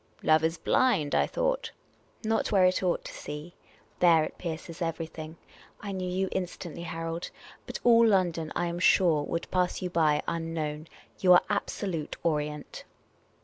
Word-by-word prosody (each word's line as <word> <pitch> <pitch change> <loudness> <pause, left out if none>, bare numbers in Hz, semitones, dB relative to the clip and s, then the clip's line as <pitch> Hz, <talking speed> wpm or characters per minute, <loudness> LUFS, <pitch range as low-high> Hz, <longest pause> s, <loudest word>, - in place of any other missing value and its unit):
" - - -27
Love 155 0 +4
is 165 +1 +1
blind, 200 - +2
I - - +3
thought." - - -1 0.3
" - - -36
Not 225 +1 0
where 195 -3 +5
it 185 0 +2
ought 180 -2 0
to - - -7
see. 150 +4 -7 0.5
There, 165 -3 +5
it - - -6
pierces 165 0 -6
everything. 165 -1 -4 0.4
I 205 - -6
knew 185 -1 -3
you 190 +1 0
instantly, 175 -2 -4
Harold. 165 0 -4 0.4
But - - -5
all 230 -1 +6
London, 175 -6 +1
I 175 - 0
am 170 0 -3
.sure, 175 -4 +4
would 170 +3 -4
pass 180 -1 +1
you 180 -1 -4
by, 155 -3 +2
unknown. 165 -2 -3 0.3
You 180 -1 +6
are 175 - +6
absolute 190 -6 -3
Orient." 150 -2 -2
170 Hz, 165 wpm, -28 LUFS, 160-185 Hz, 0.5 s, all